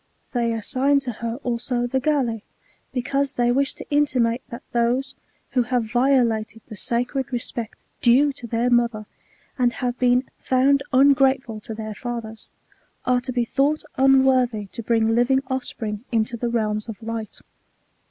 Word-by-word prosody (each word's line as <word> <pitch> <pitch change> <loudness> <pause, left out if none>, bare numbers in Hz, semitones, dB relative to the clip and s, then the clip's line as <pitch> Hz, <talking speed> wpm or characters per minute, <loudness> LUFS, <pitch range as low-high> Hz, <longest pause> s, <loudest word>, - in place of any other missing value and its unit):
They 235 -2 +1
assign 260 +6 +1
to 260 -2 -4
her 230 +1 -4
also 245 0 -1
the 265 +2 0
Galli; 255 -6 0 0.5
because 275 +2 -1
they 240 0 +2
wish 275 +2 +1
to - - -8
intimate 255 -5 +2
that 235 +2 -8
those, 240 +3 0 0.4
who 255 - +2
have 240 -2 -1
violated 235 -4 +1
the 215 - -10
sacred 245 +6 -2
respect 235 -2 -4 0.2
dtie 275 +4 +4
to 245 -4 -9
their 235 +2 0
mother, 235 -3 +2 0.5
and 245 -1 +3
have 250 -1 -3
been 250 0 +3 0.2
found 270 +2 +3
ungrateful 265 -3 +3
to 220 +1 -7
their 215 -1 -5
fathers, 230 -1 -6 0.6
are 250 0 +2
to 245 - -5
be 245 -1 0
thought 280 +5 +1
unworthy 260 -4 +3
to 235 - -6
bring 225 0 +2
living 255 +3 +3
offspring 225 -4 -3
into 225 0 0
the 235 +1 -2
realms 215 -1 -1
of 225 +1 -8
light. 225 -1 -5
245 Hz, 150 wpm, -23 LUFS, 230-265 Hz, 0.6 s, dtie